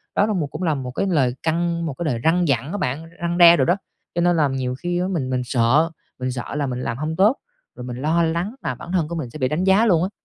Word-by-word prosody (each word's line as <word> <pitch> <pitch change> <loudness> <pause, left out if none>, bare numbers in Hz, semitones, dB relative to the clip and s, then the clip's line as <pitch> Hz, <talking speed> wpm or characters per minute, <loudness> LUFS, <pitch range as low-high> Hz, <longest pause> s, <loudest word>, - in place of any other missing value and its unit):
Đó 205 - +4
là 215 - -1
một 170 -7 -1
cũng 185 - -6
là 160 -3 +2
một 130 -2 -5
cái 195 +10 -1
lời 135 -8 +2
căng 170 +1 0
một 155 - -3
cái 170 +5 -5
lời 125 -6 -1
răn 175 +2 +3
dặn 135 0 0
đó 205 - -3
bạn, 160 -2 -3
răn 170 0 -1
đe 170 -1 +8
đồ 135 - +3
đó. 175 - +3 0.4
Cho 175 - +1
nên 175 0 +3
là 150 - +3
nhiều 130 -2 -2
khi 175 +5 -2
á 180 - 0
mình 160 -9 -2
mình 125 -1 0
sợ, 130 +7 +2 0.3
mình 130 0 -2
sợ 125 +3 -5
là 145 -2 -1
mình 125 0 -3
làm 115 - -3
hông 155 +3 -3
tốt, 210 +9 +4 0.4
rồi - - -8
mình 125 -1 -6
lo 165 +3 +2
lắng 170 +8 -1
mà 130 - -3
bản 170 - -9
thân 175 -5 +1
của 170 - -5
mình 145 -8 -4
sẽ 155 - -9
bị 130 - +2
đánh 155 +7 -1
giá 195 +4 +4
luôn 175 -6 +3
á. 185 - -1
160 Hz, 300 wpm, -22 LUFS, 130-175 Hz, 0.4 s, đe